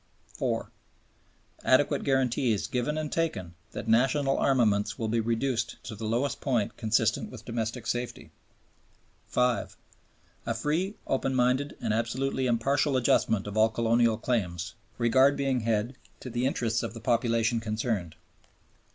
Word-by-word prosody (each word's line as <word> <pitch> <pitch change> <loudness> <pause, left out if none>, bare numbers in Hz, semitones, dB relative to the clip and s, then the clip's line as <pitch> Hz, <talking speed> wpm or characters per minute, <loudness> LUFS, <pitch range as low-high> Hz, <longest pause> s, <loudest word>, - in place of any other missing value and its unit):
(4). - - -2 0.9
"Adequate 130 +2 +3
guarantees 125 -5 +1
given 130 +5 -1
and 155 -1 -3
taken 100 - -2 0.2
that - - -6
national 135 +5 +3
armaments 105 -5 +2
will 115 - -2
be 115 +1 +1
reduced 115 +2 -1
to 120 - -6
the 110 +1 -5
lowest 125 +5 -1
point 120 -7 0
consistent 110 -1 +1
with - - -11
domestic 115 -1 -3
safety." 120 0 -4 1.0
(5). 125 -3 0 0.7
"A 115 - 0
free, 160 - -1
open 135 0 0
minded, 130 +3 +1
and 110 -3 -1
absolutely 130 +4 -1
impartial 135 +4 +2
adjustment 110 -4 +2
of 105 0 -6
all 110 +1 +5
colonial 115 0 +2
claims," 90 -8 -2 0.2
regard 130 +4 +4
being 135 -2 +1
had 115 +2 -1 0.2
to 130 - -8
the 120 +2 0
interests 115 -4 0
of - - -5
the - - -6
populations 115 -1 +1
concerned. 110 -6 -2
120 Hz, 135 wpm, -28 LUFS, 110-130 Hz, 1.0 s, all